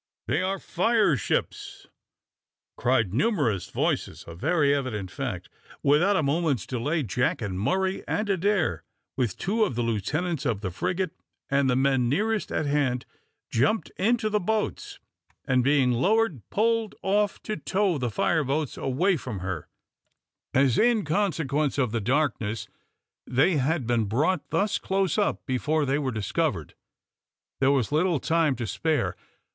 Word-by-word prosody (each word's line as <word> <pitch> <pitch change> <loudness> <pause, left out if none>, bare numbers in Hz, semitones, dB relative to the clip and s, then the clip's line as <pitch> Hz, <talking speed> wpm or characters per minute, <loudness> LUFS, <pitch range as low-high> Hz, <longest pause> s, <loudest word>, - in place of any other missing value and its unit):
"They 145 +8 0
are 190 +1 -1
fire 205 -2 +2
ships," 115 - -3 0.9
cried 115 -7 +1
numerous 130 - +1
voices - - -2
a 85 - -8
very 145 - +2
evident 115 -9 -3
fact. - - -4 0.4
Without 165 +9 +4
a 160 - +2
moment's 145 - 0
delay, 145 +6 -1
Jack 125 +3 0
and 100 -5 -4
Murray 190 - 0
and 215 +1 -1
Adair, 190 - +1 0.3
with 125 -7 -1
two 220 +4 +1
of 190 - -1
the 120 - 0
lieutenants 145 - -1
of 115 -8 -1
the 95 -4 -3
frigate, 180 - -2 0.4
and 140 -1 +3
the 125 - +2
men 130 -2 +2
nearest 210 - 0
at 155 - -1
hand, 140 -3 0 0.5
jumped 145 - +1
into 225 +2 +1
the 210 0 +1
boats, 215 +3 -2 0.5
and, 130 -1 +2
being 135 -2 +3
lowered, 185 - +2
pulled 225 0 +1
off 205 +1 +1
to 215 - -3
tow 195 -6 0
the 125 -2 -1
fire 150 +7 +1
ships 140 +1 -2
away 170 +8 +1
from 125 -7 -6
her; 90 -4 -4 0.8
as, 135 -3 +3
in 230 -4 +3
consequence 155 -5 0
of 125 -5 +1
the 115 -1 -1
darkness, 115 -3 0 0.6
they 135 +7 +3
had 140 0 0
been 115 -2 +1
brought 150 - 0
thus 205 0 +1
close 195 +1 0
up 205 - 0
before 150 +3 0
they 135 +2 +1
were 135 -3 -1
discovered, 110 -4 -2 0.9
there 135 - +3
was 135 -4 +1
little 160 +1 +2
time 160 -1 +2
to 120 - -4
spare. 150 - -1
145 Hz, 150 wpm, -26 LUFS, 125-190 Hz, 0.9 s, Without